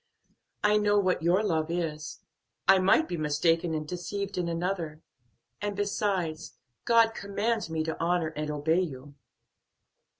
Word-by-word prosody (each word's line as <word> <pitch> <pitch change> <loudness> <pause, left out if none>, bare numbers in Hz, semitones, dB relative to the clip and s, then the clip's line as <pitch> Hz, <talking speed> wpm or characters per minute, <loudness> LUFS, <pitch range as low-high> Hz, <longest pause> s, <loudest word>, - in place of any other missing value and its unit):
I 210 0 +4
know 205 0 +3
what 185 -3 +2
your 175 +5 +3
love 160 -5 0
is, 160 -3 -3 0.5
I 195 0 +7
might 195 - +4
be 175 - -3
mistaken 160 +2 +1
and 155 -1 -4
deceived 195 +3 -4
in 180 -1 -1
another. 165 -2 -3 0.6
And 205 -1 -2
besides, 195 -5 -2 0.3
God 230 -1 +5
commands 210 0 -2
me 160 -1 -1
to 160 0 -4
honor 170 -1 +1
and 150 -1 -4
obey 150 +3 +1
you." 145 -4 -6
175 Hz, 140 wpm, -28 LUFS, 160-200 Hz, 0.6 s, I